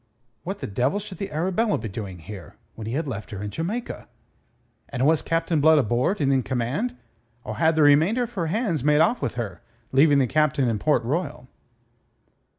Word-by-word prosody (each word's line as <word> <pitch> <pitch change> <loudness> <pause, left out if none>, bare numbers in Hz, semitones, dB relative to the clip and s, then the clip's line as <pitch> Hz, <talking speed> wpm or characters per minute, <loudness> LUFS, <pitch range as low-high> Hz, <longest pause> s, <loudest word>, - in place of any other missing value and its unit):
What 195 +3 -6
the - - -3
devil 125 - 0
should 205 -3 -7
the 200 - -4
Arabella 190 +8 0
be 110 - -5
doing 95 -2 -6
here, 95 +2 -10 0.2
when 110 -1 -8
he 115 - -3
had 150 +3 -1
left 110 -6 -5
her 100 -1 -6
in 105 - -4
Jamaica? 200 - -4 0.8
And 130 0 -1
was 160 +1 +4
Captain 165 -1 0
Blood 160 +1 +6
aboard 125 - +1
and 140 -2 +2
in 130 - +3
command, 130 - -2 0.5
or 110 0 -6
had 160 +4 +3
the 155 - +4
remainder 160 - +4
of 240 0 -6
her 170 -6 -2
hands 180 - -1
made 150 +1 +4
off 235 +10 +3
with - - -2
her, 105 -8 -5 0.3
leaving 145 +2 +5
the 135 - +4
Captain 150 0 +1
in 110 -3 0
Port 145 -1 +2
Royal? 130 -1 -3
150 Hz, 195 wpm, -24 LUFS, 120-170 Hz, 0.8 s, Blood